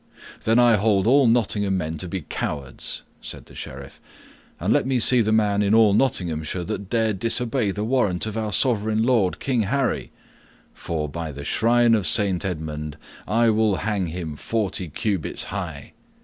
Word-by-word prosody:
"Then 115 +1 +3
I 120 -3 +5
hold 100 -2 +2
all 135 +2 +5
Nottingham 105 -4 +1
men 80 -3 -4
to 90 - -5
be 95 +1 -4
cowards," 70 -2 -4 0.2
said - - -7
the - - -17
Sheriff. 70 +1 -9 0.6
"And - - +1
let - - +1
me 130 -1 +1
see 125 +1 +5
the 110 -1 0
man 105 -2 +2
in 105 +1 +3
all 110 -3 +5
Nottinghamshire 90 -8 0
that 95 +3 -5
dare 115 -2 +1
disobey 115 +2 +1
the 105 +2 -3
warrant 110 -7 0
of 110 -1 -5
our 110 -1 -2
sovereign 110 0 +1
lord 115 -7 +2
King 125 -4 0
Harry, 130 +5 -1 0.6
for, 80 -2 -3
by 80 +1 -5
the 70 0 -8
shrine 120 +1 +3
of 105 -6 +1
Saint 95 +1 +2
Edmund, 75 -4 -4 0.3
I 115 +3 +3
will 110 -2 +2
hang 100 -2 -1
him 80 -2 -5
forty 100 -4 -2
cubits 95 +2 -2
high! - - -6
105 Hz, 170 wpm, -23 LUFS, 90-115 Hz, 0.6 s, I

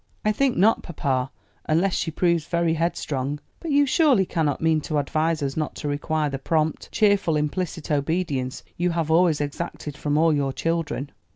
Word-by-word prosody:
"I 215 - +4
think 260 +3 +1
not, 215 +5 +4
papa; 135 -6 -2 0.4
unless 175 +4 +2
she - - -1
proves 170 -1 +1
very 170 -1 +1
head 165 +2 0
strong; 140 +1 -3 0.2
but 335 - -6
you 285 0 +4
surely 275 - +4
cannot 155 -5 0
mean 160 -1 +2
to 150 0 -2
advise 155 +2 0
us 135 -1 -2
not 155 -1 -2
to 150 - -5
require 150 +1 -1
the 135 -1 -4
prompt, 155 +2 -1
cheerful, 200 -6 +3
implicit 160 +1 -3
obedience 145 -3 -1
you 175 +1 +1
have 165 -2 -1
always 165 -2 +4
exacted 150 0 -4
from 145 0 -1
all 160 0 +4
your 140 -2 0
children?" 165 -4 -2
160 Hz, 180 wpm, -24 LUFS, 145-175 Hz, 0.4 s, I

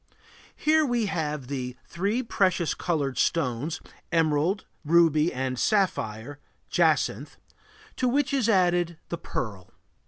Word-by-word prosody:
Here 310 +1 +3
we 240 -5 +1
have 150 -7 -2
the 125 -2 -4
three 205 +8 -1
precious 185 -7 +1
colored 145 -6 -1
stones, 145 -1 0 0.3
emerald, 165 +4 +1 0.2
ruby, 165 0 +4
and 130 -1 -3
sapphire 145 - 0 0.3
(jacinth), - - +1 0.6
to 255 - +1
which 280 +2 +1
is 255 -5 +2
added 175 -4 +2
the 170 - -4
pearl. 100 - -5
170 Hz, 115 wpm, -26 LUFS, 140-200 Hz, 0.6 s, ruby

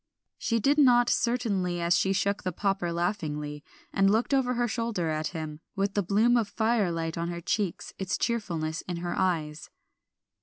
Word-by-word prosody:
She 230 -1 0
did 280 +7 +3
not 245 -3 +5
certainly 205 -8 0
as 170 +1 +2
she 190 - +2
shook 200 +1 0
the 185 - -2
popper 195 -1 -1
laughingly, 150 -4 -2 0.3
and 195 0 +4
looked 225 +6 +1
over 255 -2 +2
her 240 0 +1
shoulder 225 -7 -1
at 155 0 -1
him, 155 -3 -6 0.2
with 195 0 0
the 205 - +2
bloom 215 +6 +3
of 225 -3 +1
fire 220 -3 +1
light 165 0 -3
on 170 - -1
her 170 0 -4
cheeks, 190 +1 -2
its 190 -1 -1
cheerfulness 170 -9 -2
in 175 -2 -3
her 175 0 -3
eyes. 160 -5 -1
190 Hz, 180 wpm, -28 LUFS, 170-230 Hz, 0.3 s, not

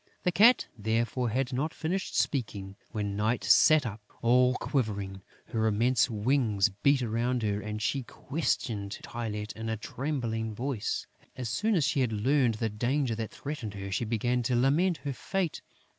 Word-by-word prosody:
The 180 - +2
Cat, 220 +8 +6
therefore, 115 +2 0
had 125 +3 -1
not 145 +5 -1
finished 180 +4 -2
speaking, 100 -8 -1 0.2
when 100 -2 -2
Night 110 +4 0
sat 155 -3 +6
up, 105 -1 -5 0.2
all 125 +2 +4
quivering. 100 -9 -2 0.3
Her 110 -1 +1
immense 120 +4 +3
wings 110 -2 +2
beat 130 +7 +2
around 120 +2 0
her; 105 -1 0
and 105 +1 -4
she 135 +5 0
questioned 120 -7 -2
Tylette 105 -3 -4
in 110 0 -4
a 110 - -1
trembling 115 -3 -3
voice. 125 -2 -2 0.3
As 125 -3 -4
soon 215 - +1
as 165 - +3
she 145 +1 +1
had 125 -3 +1
learned 125 +2 +2
the 115 +1 -1
danger 120 +4 0
that 110 -1 -3
threatened 130 -8 -6
her, 100 0 -6
she 110 +5 0
began 120 +3 0
to 120 +1 0
lament 150 +8 +3
her 140 - -1
fate. 180 +4 -2
120 Hz, 165 wpm, -29 LUFS, 105-135 Hz, 0.3 s, Cat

